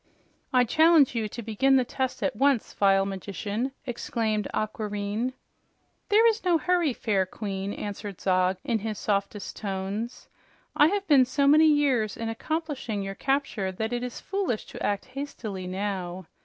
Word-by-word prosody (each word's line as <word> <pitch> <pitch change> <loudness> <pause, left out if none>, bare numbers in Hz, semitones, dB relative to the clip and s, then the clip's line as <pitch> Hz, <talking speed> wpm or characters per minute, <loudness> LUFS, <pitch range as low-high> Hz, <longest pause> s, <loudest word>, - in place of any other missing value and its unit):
"I 250 -2 +5
challenge 310 +3 +5
you 225 -3 -1
to 235 +2 -7
begin 250 +5 +2
the 255 -2 +3
test 260 +1 -3
at - - 0
once, 275 -1 +2
vile 195 -1 +3
magician!" 200 +5 -3
exclaimed 225 -3 -1
Aquareine. 215 +2 -2 0.8
"There 435 +3 +6
is 450 0 +1
no 355 -2 +4
hurry, 345 -2 +2
fair 200 -6 0
Queen," 195 -1 -4
answered 205 -2 -6
Zog 185 0 +2
in 230 -2 0
his 215 0 -4
softest 200 0 -2
tones. 200 +3 -4 0.5
"I 295 -1 +6
have 400 +3 -1
been 280 -7 +6
so 275 +3 +1
many 305 +3 +7
years 270 -8 +2
in 230 -1 -3
accomplishing 260 -4 -3
your 195 0 -4
capture 265 -5 -1
that 220 +5 -3
it 240 - -1
is 250 -1 -5
foolish 390 - -2
to - - -6
act 205 -1 -1
hastily 250 -8 -6
now. 185 -1 -3
225 Hz, 155 wpm, -27 LUFS, 200-275 Hz, 0.8 s, many